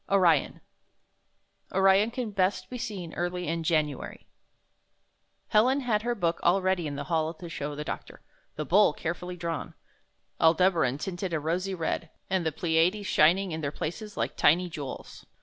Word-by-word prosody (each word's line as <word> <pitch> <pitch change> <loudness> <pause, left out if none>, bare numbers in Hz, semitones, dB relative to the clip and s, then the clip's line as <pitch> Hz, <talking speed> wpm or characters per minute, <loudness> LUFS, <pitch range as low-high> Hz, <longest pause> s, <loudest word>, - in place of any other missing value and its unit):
ORION 175 -7 +3 1.1
Orion 195 +3 +4
can 235 -2 -4
best 185 -1 0
be 250 - -5
seen 195 -8 -5
early 175 0 -3
in 165 +1 -1
January 155 -4 -1 1.2
Helen 255 +6 +4
had 225 -5 +1
her 240 +1 -1
book 170 -5 0
all 180 +3 +4
ready 185 -3 0
in 145 - -4
the 140 - -4
hall 160 -1 -1
to 175 - -9
show 145 -3 -5
the 150 - -4
doctor, - - -7 0.3
the 155 - -3
Bull 195 -1 +5
carefully 180 +3 -5
drawn, 170 -1 -4 0.6
Aldebaran 160 -5 +3
tinted 180 +2 -4
a 160 - +1
rosy 180 +5 -2
red, 165 -1 -2 0.2
and 190 -2 +1
the 160 - 0
Pleiades 170 +6 +1
shining 180 +4 +3
in 160 0 -4
their 145 - -1
places 210 +8 -6
like - - -2
tiny 175 +3 +3
jewels. 145 -4 -8
175 Hz, 160 wpm, -28 LUFS, 160-195 Hz, 1.2 s, Bull